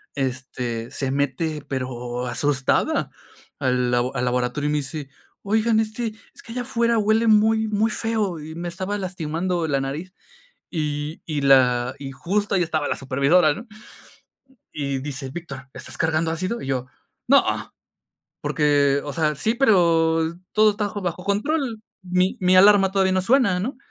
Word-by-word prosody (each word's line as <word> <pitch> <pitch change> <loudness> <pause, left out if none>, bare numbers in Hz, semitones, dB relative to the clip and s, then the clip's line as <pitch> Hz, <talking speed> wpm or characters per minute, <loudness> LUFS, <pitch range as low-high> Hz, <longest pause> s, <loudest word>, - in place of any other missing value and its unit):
este, 125 -3 -3
se 135 -1 -2
mete, 145 +2 -1
pero 125 -2 -4
asustada, 130 +2 0 0.5
al 125 -1 +1
labo 125 +2 0
al 125 -1 0
laboratorio 125 +4 0
y - - 0
me - - +2
dice: 145 0 -6 0.3
"Oigan, 220 +2 +2
este, 220 +1 -2 0.2
es - - -14
que 230 - -9
allá 250 - -2
afuera 235 0 +1
huele 220 +2 +2
muy 220 +1 +4
muy 215 +1 +1
feo, 210 -6 -1
y 155 +1 -8
me 175 +1 -5
estaba 185 +4 -3
lastimando 175 -2 -2
la 140 -2 +1
nariz". 155 +7 -5 0.6
Y 150 -1 -3
y 150 -3 -2
la 125 -2 +4
y 135 -1 -6
justo 195 +10 -1
ahí 180 - +3
estaba 155 -3 -1
la - - -1
supervisora, 140 +5 +3
¿no? 235 +9 -9 1.1
Y 140 -2 -2
dice: 135 -1 -5
"Víctor, 135 -5 -8
¿estás - - -7
cargando 160 0 +1
ácido?" 185 +8 -3
Y - - -6
yo: 130 -1 -1 0.4
"No, - - +6 1.0
porque, 145 -2 +2
o 145 - -5
sea, 155 -2 +1
sí, 220 +11 0
pero 165 -8 +3 0.2
todo 215 0 +5
está 205 0 -2
jo 205 0 -6
bajo 180 0 -3
control. 225 +3 -1 0.2
Mi 180 +1 +1
mi 185 0 +3
alarma 195 0 +6
todavía 190 -1 +2
no 185 - +2
suena", 215 -3 +3
¿no? 245 +8 -3
165 Hz, 160 wpm, -23 LUFS, 135-205 Hz, 1.1 s, No